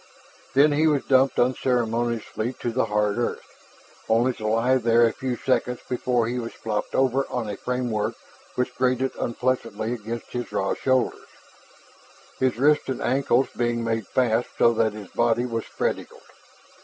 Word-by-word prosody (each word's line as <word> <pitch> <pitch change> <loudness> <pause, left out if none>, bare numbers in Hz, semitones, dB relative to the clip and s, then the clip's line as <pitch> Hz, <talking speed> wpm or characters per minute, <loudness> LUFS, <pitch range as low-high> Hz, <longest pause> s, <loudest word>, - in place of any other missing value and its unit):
Then 145 +3 +6
he 155 +2 +3
was 145 -3 +2
dumped 130 0 +3
unceremoniously 120 -2 0
to 120 - -4
the 125 0 +1
hard 105 0 0
earth, 120 - -2 0.6
only 120 +3 +3
to 110 -2 -5
lie 115 +4 +3
there 120 -1 +4
a 115 - +1
few 130 -2 -3
seconds 125 -1 0
before 125 -1 0
he 120 +2 -2
was 115 -1 -5
flopped 105 -2 -3
over 135 +1 +2
on 120 -3 -3
a 105 - -4
framework 125 -4 -2 0.4
which 125 - -1
grated 130 +1 0
unpleasantly 120 -1 -1
against 115 0 -6
his 120 -1 -4
raw 95 - 0
shoulders, 130 -1 0 1.1
his 130 -3 +1
wrists 150 +3 +3
and 130 - -2
ankles 135 0 +2
being 120 -1 0
made 115 -2 -1
fast 120 -2 +1
so 115 - +5
that 110 -1 +1
his 105 -3 -9
body 120 +1 +1
was 115 -2 -3
spread - - -1
eagled. - - -13
120 Hz, 160 wpm, -24 LUFS, 115-130 Hz, 1.1 s, Then